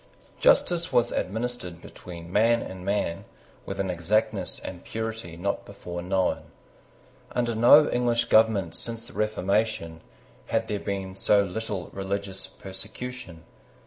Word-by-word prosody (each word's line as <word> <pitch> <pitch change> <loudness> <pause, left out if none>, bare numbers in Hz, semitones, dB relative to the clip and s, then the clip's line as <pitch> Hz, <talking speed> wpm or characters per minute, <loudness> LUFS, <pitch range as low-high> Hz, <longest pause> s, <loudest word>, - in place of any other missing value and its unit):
Justice 175 - +4
was 120 -2 +3
administered 110 -4 -3
between 85 -1 -10
man 115 +2 +4
and 95 -1 -8
man 100 -4 -1 0.4
with - - -4
an 95 -1 0
exactness 90 +5 0
and 90 -2 -8
purity 110 -6 -5
not 100 +4 -1
before 85 0 -7
known. 90 -4 0 0.9
Under 120 -1 +1
no 120 +7 +7
English 120 -1 +2
government 110 -6 +4
since 115 0 -4
the - - -12
Reformation, 105 -5 0 0.5
had - - +1
there 105 - -2
been 95 -2 -3
so 100 +1 +4
little 100 -1 -4
religious 95 0 -3
persecution. 95 -2 -7
100 Hz, 125 wpm, -27 LUFS, 90-115 Hz, 0.9 s, no